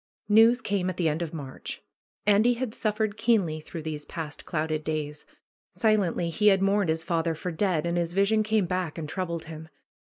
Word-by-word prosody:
News 225 +4 +6
came 195 -5 -1
at 180 - -5
the 170 - +1
end 155 +2 0
of 165 -2 -3
March. 140 -5 -7 0.4
Andy 210 +4 +4
had 240 -2 -3
suffered 215 -1 -1
keenly 200 -9 +2
through 160 +1 -8
these 150 -1 -4
past 155 -2 -7
clouded 155 -1 -2
days. 150 -1 -4 0.5
Silently 200 -6 +1
he 210 +6 +2
had 195 -2 +6
mourned 195 -1 +2
his 160 0 0
father 165 -1 0
for 180 +3 -4
dead, 170 -1 0
and 170 0 0
his 170 0 -2
vision 200 +3 +3
came 215 -2 +1
back 180 -2 -2
and 160 -2 -4
troubled 170 0 -3
him. 160 0 -9
175 Hz, 190 wpm, -27 LUFS, 160-210 Hz, 0.5 s, News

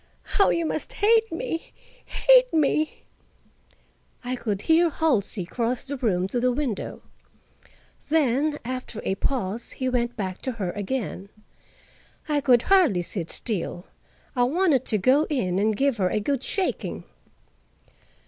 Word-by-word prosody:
How 400 - +2
you 335 -1 +1
must 310 - -2
hate 450 +2 +3
me—hate - - +1
me!" 310 0 +1 1.2
I 250 +1 -2
could 210 -5 -3
hear 330 +1 +4
Halsey 230 - 0
cross 235 +6 -2
the 285 +1 -4
room 190 -8 0
to 245 - -1
the 250 +1 +2
window. 250 -4 -3 1.1
Then, 295 0 +2
after 255 -3 -5
a - - +1
pause, 225 0 -3
he 260 - -3
went 240 -1 -1
back 190 -3 -4
to 260 - -3
her 195 -6 -3
again. 205 -2 -4 1.0
I 295 -2 +1
could 250 -4 +4
hardly 345 - +4
sit 170 -2 -4
still; 185 -4 -3 0.5
I 245 - +1
wanted 310 -1 +2
to 215 - +2
go 260 +10 +3
in 190 - 0
and 215 0 +1
give 275 -3 +1
her 185 -3 +1
a 210 - 0
good 265 +5 -1
shaking. 380 +6 -2
255 Hz, 140 wpm, -25 LUFS, 210-310 Hz, 1.2 s, hear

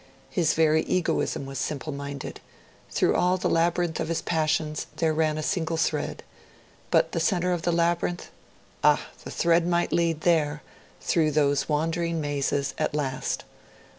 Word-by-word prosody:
His 165 -5 +2
very 160 0 +4
egoism 175 -5 0
was 135 -1 -5
simple 150 +2 -3
minded; 140 0 -6 0.5
through - - +2
all 180 +1 +3
the 185 - -1
labyrinth 170 0 +1
of - - -1
his 165 0 -2
passions 155 -1 0
there 160 0 +1
ran 155 -1 +1
a 155 - -3
single 165 0 -1
thread. 160 - -1 0.7
But - - +3
the - - -1
centre 180 -2 +1
of 175 - -2
the 175 - +1
labyrinth? 170 +1 0 0.5
Ah! - - +4 0.2
the - - -7
thread 170 0 +2
might 175 0 +1
lead 165 -2 +1
there, 150 -4 +1 0.4
through 160 -3 +2
those 145 -1 +2
wandering 165 +2 0
mazes, 140 -1 -1
at 155 -1 0
last. 135 -3 -2
160 Hz, 155 wpm, -26 LUFS, 150-170 Hz, 0.7 s, very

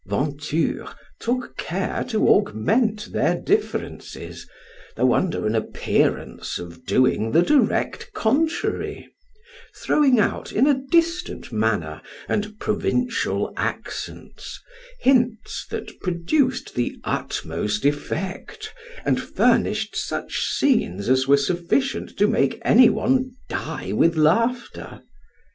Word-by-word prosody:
Venture 145 +8 -1 0.3
took 250 +2 -2
care - - -2
to 225 -4 +1
augment 210 - +2
their - - +2
differences, 420 +1 -3 0.5
though - - +3
under 185 -4 0
an 105 - +1
appearance 110 -1 -1
of 85 +7 -10
doing 115 -3 +2
the 165 +2 +5
direct 295 - +1
contrary, 315 - -1 0.7
throwing 270 -5 +3
out 205 - 0
in 245 - +3
a 290 - +5 0.2
distant 335 +2 0
manner, - - -1 0.3
and 210 0 -2
provincial 240 +2 -1
accents, - - -5 0.4
hints 245 -4 +1
that - - -7
produced 250 - 0
the 120 - -2
utmost 105 +6 -2
effect, 165 +6 -3 0.3
and - - +2
furnished - - +1
such - - -3
scenes 115 - +1
as 130 +1 +3
were 140 +1 +6
sufficient 175 - -1
to 205 - +4
make 135 -9 +1
any 245 +1 +7
one 255 +1 0
die 140 - -4
with 165 +11 +3
laughter. 230 +11 0
210 Hz, 105 wpm, -23 LUFS, -, 0.7 s, any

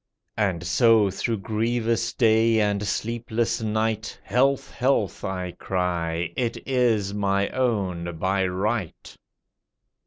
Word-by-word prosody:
And 90 -5 0
so 110 +2 +4
through 115 +4 -2
grievous 115 +1 0
day 115 -1 +3
and 105 -1 0
sleepless 115 +1 -1
night, 110 0 -1
"Health, 135 +2 +1
health," 125 -5 0
I 90 -1 -3
cry, 85 -2 -2
"it 120 -2 -1
is 115 -7 +1
my 100 -1 0
own 95 -9 -1
by 95 +2 +1
right." 95 +1 -3
110 Hz, 105 wpm, -24 LUFS, 95-115 Hz, -, so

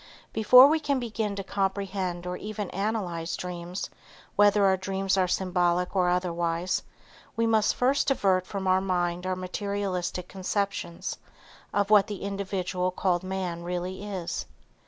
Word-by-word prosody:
Before 250 +4 +8
we 310 +3 +4
can 285 -3 0
begin 220 -4 -2
to 200 - -4
comprehend 190 -2 -2
or 180 0 -3
even 210 0 -5
analyze 180 -5 -2
dreams, 180 +1 -5 0.4
whether 205 0 +5
our 190 -1 +5
dreams 190 0 -1
are 185 -1 +2
symbolic 180 0 +1
or 180 -2 +3
otherwise, 175 0 0 0.5
we 230 - +1
must 220 -2 +3
first 265 +3 +2
divert 190 -8 +2
from 195 -2 -4
our 185 0 +3
mind 180 -1 -1
our 185 - 0
materialistic 185 -1 -3
conceptions 195 -2 -3 0.5
of 205 0 0
what 205 -2 +6
the 205 -3 -6
individual 190 -2 -2
called 180 -1 0
man 185 -2 -3
really 180 +2 -4
is. 190 -5 -4
190 Hz, 140 wpm, -27 LUFS, 180-205 Hz, 0.5 s, Before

